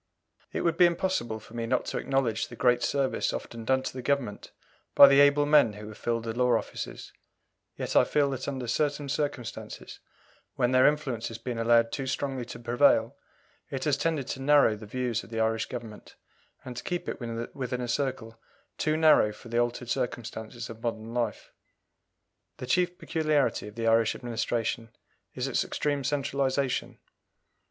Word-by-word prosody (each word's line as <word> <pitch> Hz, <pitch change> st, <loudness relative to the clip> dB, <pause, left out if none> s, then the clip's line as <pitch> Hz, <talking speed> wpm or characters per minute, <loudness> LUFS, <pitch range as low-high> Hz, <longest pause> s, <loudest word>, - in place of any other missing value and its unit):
It -, -, -2 dB
would 170 Hz, -1 st, +1 dB
be 180 Hz, -, +7 dB
impossible 170 Hz, -11 st, -1 dB
for 110 Hz, -, -16 dB
me 115 Hz, -1 st, -3 dB
not -, -, 0 dB
to -, -, -3 dB
acknowledge 130 Hz, -5 st, 0 dB
the 120 Hz, -, -10 dB
great 120 Hz, 0 st, +3 dB
service 140 Hz, 0 st, 0 dB
often 115 Hz, -1 st, -6 dB
done 130 Hz, +1 st, +2 dB
to -, -, -4 dB
the 130 Hz, -, -6 dB
Government 125 Hz, -6 st, -2 dB, 0.5 s
by 140 Hz, -, +11 dB
the 140 Hz, 0 st, +5 dB
able 145 Hz, +1 st, +5 dB
men 145 Hz, -7 st, +5 dB
who 105 Hz, +1 st, -9 dB
have 110 Hz, -, -11 dB
filled 115 Hz, -1 st, -1 dB
the 115 Hz, -1 st, -3 dB
law 125 Hz, 0 st, +3 dB
offices, -, -, -7 dB, 0.6 s
yet -, -, -4 dB
I -, -, +7 dB
feel 145 Hz, -1 st, +2 dB
that 130 Hz, -1 st, -4 dB
under 135 Hz, -3 st, -3 dB
certain 145 Hz, +4 st, -1 dB
circumstances, 145 Hz, -5 st, -4 dB, 0.6 s
when 125 Hz, 0 st, +1 dB
their 130 Hz, 0 st, +6 dB
influence 140 Hz, -6 st, -1 dB
has 115 Hz, -, -7 dB
been 115 Hz, 0 st, -5 dB
allowed 115 Hz, 0 st, +4 dB
too 135 Hz, -1 st, -3 dB
strongly 130 Hz, -2 st, -2 dB
to 125 Hz, -, -8 dB
prevail, 120 Hz, +1 st, +3 dB, 0.5 s
it 135 Hz, -, -4 dB
has 150 Hz, -3 st, +2 dB
tended 160 Hz, -4 st, -1 dB
to 135 Hz, -, -4 dB
narrow 140 Hz, -5 st, +5 dB
the 105 Hz, 0 st, -11 dB
views 120 Hz, 0 st, -2 dB
of -, -, -14 dB
the 115 Hz, -1 st, -4 dB
Irish 110 Hz, 0 st, +1 dB
Government, 115 Hz, -4 st, -9 dB, 0.5 s
and 125 Hz, -1 st, -7 dB
to -, -, -6 dB
keep 175 Hz, 0 st, -3 dB
it -, -, -5 dB, 0.3 s
within 125 Hz, -2 st, -3 dB
a 120 Hz, -, -3 dB
circle 120 Hz, -3 st, -3 dB, 0.4 s
too 155 Hz, 0 st, +1 dB
narrow 155 Hz, -9 st, +5 dB
for 115 Hz, +2 st, -13 dB
the 120 Hz, +1 st, +1 dB
altered 120 Hz, 0 st, -1 dB
circumstances 115 Hz, -1 st, -4 dB
of 115 Hz, 0 st, -10 dB
modern 115 Hz, -1 st, -4 dB
life. 120 Hz, -1 st, -2 dB, 1.1 s
The -, -, -6 dB
chief 175 Hz, +8 st, +1 dB
peculiarity 155 Hz, -10 st, 0 dB
of 105 Hz, -, -11 dB
the 115 Hz, -1 st, -3 dB
Irish 115 Hz, 0 st, +3 dB
Administration 115 Hz, -1 st, -2 dB, 0.5 s
is -, -, -2 dB
its -, -, +1 dB
extreme 145 Hz, -2 st, -2 dB
centralization. 135 Hz, -1 st, -1 dB
125 Hz, 180 wpm, -28 LUFS, 115-140 Hz, 1.1 s, by